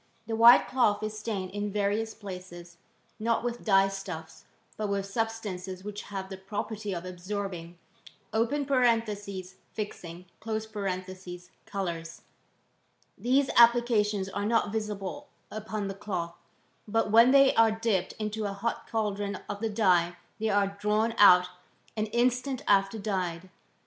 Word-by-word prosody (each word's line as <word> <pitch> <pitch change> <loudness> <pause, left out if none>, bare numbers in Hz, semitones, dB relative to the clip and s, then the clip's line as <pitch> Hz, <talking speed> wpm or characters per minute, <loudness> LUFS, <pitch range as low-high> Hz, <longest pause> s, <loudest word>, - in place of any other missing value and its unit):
The 225 0 -3
white 235 +2 +8
cloth 215 -5 +2
is 215 0 -3
stained 205 -4 -3
in 205 +1 -3
various 210 +2 -1
places, 180 -3 -9 0.4
not 230 +1 0
with 240 0 -3
dye 195 -2 +5
stuffs, 180 -5 -7 0.3
but 215 - -2
with 200 -1 -1
substances 195 -4 -4
which 210 0 -6
have 195 -2 -5
the 190 - -6
pro 195 +2 -4
perty 215 -2 -6
of 170 - -7
absorbing 180 -2 -5 0.6
{fixing) 215 - -1
colours, 185 -5 -5 0.9
these 265 +3 +2
applcations 230 -4 +4
are 200 0 -2
not 225 -2 +2
visible 215 +5 -4 0.2
upon 215 -1 -4
the 195 - -4
cloth; 185 -4 -4 0.5
but 220 0 0
when 230 +3 +7
they 275 0 +6
are 225 0 +5
dipped 215 -5 -1
into 215 0 -3
a 200 - -2
hot 215 +4 -3
caldron 205 -2 -2
of 200 - -5
the 225 +1 -1
dye 180 -5 +2 0.2
they 220 0 0
are 200 -1 +1
drawn 215 +2 +1
out 180 -3 +8 0.5
an 215 0 -1
instant 250 +3 0
after 195 +2 +3
dyed. 185 -4 -3
205 Hz, 130 wpm, -28 LUFS, 190-225 Hz, 0.9 s, white